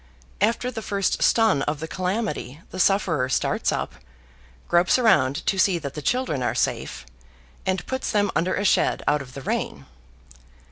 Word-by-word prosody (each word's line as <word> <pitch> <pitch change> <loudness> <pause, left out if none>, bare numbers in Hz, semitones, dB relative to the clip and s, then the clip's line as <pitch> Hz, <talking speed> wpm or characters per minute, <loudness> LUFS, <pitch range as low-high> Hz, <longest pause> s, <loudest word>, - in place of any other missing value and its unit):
After 235 +3 +1
the 225 -2 -5
first 200 -2 -1
stun 220 -11 +4
of 150 -1 -3
the 160 - -5
calamity 185 - -3
the 185 - -6
sufferer 175 -9 +2
starts - - 0
up, - - -3 0.7
gropes 175 +5 +4
around 150 - +3
to 195 - +1
see 185 -2 +4
that 140 -4 -6
the 150 - -6
children 245 - 0
are 125 - 0
safe, - - -2 0.6
and 190 -2 0
puts 260 0 -3
them 205 -2 +2
under 180 +2 +1
a 200 - -1
shed - - +2
out 145 0 +2
of 125 -2 -11
the 135 - -7
rain. - - -3
185 Hz, 170 wpm, -24 LUFS, 145-210 Hz, 0.7 s, stun